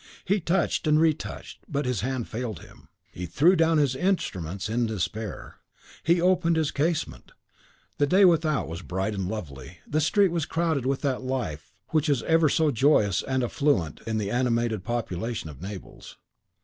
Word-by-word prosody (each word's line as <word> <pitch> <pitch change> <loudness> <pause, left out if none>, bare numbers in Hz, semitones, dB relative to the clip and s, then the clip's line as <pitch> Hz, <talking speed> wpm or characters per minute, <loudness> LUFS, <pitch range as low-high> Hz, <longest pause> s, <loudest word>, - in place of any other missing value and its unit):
He 200 +2 +2
touched 170 -1 0
and 155 0 +4
retouched, 160 -1 -1
but 145 -1 -1
his 125 -6 -1
hand 130 0 -2
failed 115 -5 -5
him; - - -17 0.2
he 90 0 -6
threw 155 - +4
down 165 -1 +3
his 140 -4 +2
instruments 100 - -1
in 115 +2 0
despair; 110 0 -4 0.4
he 170 +2 +3
opened 175 -1 +3
his 160 -2 +1
casement: 155 +3 -2 0.7
the 145 - +3
day 190 +5 +5
without 160 -4 +2
was 85 +2 -6
bright 95 +3 -2
and 95 -3 -3
lovely; 80 - -7
the 155 +2 0
street 195 +4 +3
was 165 -3 -1
crowded 160 -6 0
with 135 0 0
that 135 -4 -1
life 130 - -4
which 155 -1 +1
is 135 -5 +1
ever 165 -2 +3
so 155 +1 +2
joyous 110 -7 +3
and 130 -1 -1
affluent 120 - 0
in 110 -1 -1
the 100 -2 -2
animated 120 -4 0
population 115 -5 -3
of 70 - -14
Naples. 95 -1 -9
130 Hz, 170 wpm, -26 LUFS, 105-160 Hz, 0.7 s, day